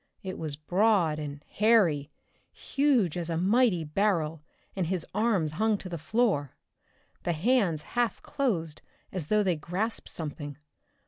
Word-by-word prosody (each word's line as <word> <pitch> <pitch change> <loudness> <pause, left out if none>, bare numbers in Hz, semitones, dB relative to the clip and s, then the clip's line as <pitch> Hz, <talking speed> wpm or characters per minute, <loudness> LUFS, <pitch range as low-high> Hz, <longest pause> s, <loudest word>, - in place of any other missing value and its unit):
It 185 -1 -5
was 155 -3 -3
broad 175 0 +2
and 145 -1 -6
hairy, 195 -10 +3 0.4
huge 265 - +1
as 170 -1 -3
a 165 - 0
mighty 195 -1 +3
barrel, 160 -2 0 0.3
and 185 -4 -1
his 180 -1 -2
arms 205 -7 +1
hung 215 +6 +1
to 190 - -8
the 170 -2 -5
floor, 160 - 0 0.7
the 175 - 0
hands 180 - +2
half 240 -1 +1
closed 175 - -1 0.3
as 180 -6 -4
though 210 +3 +3
they 185 -3 +2
grasped 185 +9 -3
something. 145 -2 -6
180 Hz, 140 wpm, -28 LUFS, 155-215 Hz, 0.7 s, hairy